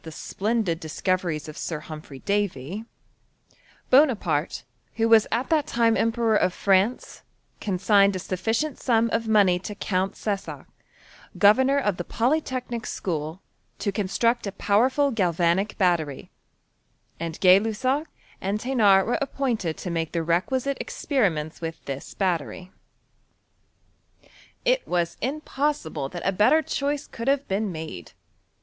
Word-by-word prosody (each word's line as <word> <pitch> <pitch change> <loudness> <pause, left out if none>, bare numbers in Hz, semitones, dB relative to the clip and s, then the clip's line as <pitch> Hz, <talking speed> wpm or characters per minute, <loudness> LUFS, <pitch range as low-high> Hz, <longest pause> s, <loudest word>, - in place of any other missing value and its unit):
271 210 +8 -2
o£ - - -10
the 175 - 0
8|dendki - - -15
discoreries 165 -1 -2
of 155 - -8
Sir 155 -3 -4
Humphry 150 -3 -10
Darj, 200 - -2 1.0
Booa^Mutey 210 - +3 0.3
who 225 0 +2
^as 225 -2 +6
at 245 +7 -1
that 310 -3 +2
time 230 -1 +2
Emperor 230 -1 +1
of 185 -3 +2
France, 200 +5 +1 0.4
consigned 200 0 +3
a - - 0
sufficient 225 - -2
sum 230 -2 +2
of 225 0 0
money 200 -5 +4
to 205 +3 -7
Count 190 0 -1
Cessac, 200 -2 -4 0.7
governor 260 +7 +5
of 205 -9 0
the 175 - -3
Polytechnic 250 - -1
School, 160 0 -4 0.3
to 200 - -1
construct 210 +4 0
a - - -3
powerful 260 +9 +2
galvanic 180 -1 +1
battery; 170 -8 0 0.9
and 165 -1 -5
Gay 185 0 +7
Lussac 255 +8 -1 0.3
and 200 +2 -1
Thenard 215 -6 +4
were 240 - 0
appointed 245 - -2
to 180 - -5
make 165 -1 -2
the 165 -1 0
requisite 255 +11 0
ex* - - -8
periments 170 - 0
with 165 -1 -6
this 135 -1 -6
battery. 180 - -2 1.9
It - - +2
was 170 -1 -1
impossible 265 - -2
that 175 - -7
a - - +3
better 215 +12 +4
choice 285 0 -2
could 230 +2 -7
have 280 0 +1
been 200 +1 -1
made. 155 - -8
200 Hz, 135 wpm, -25 LUFS, 175-240 Hz, 1.9 s, Gay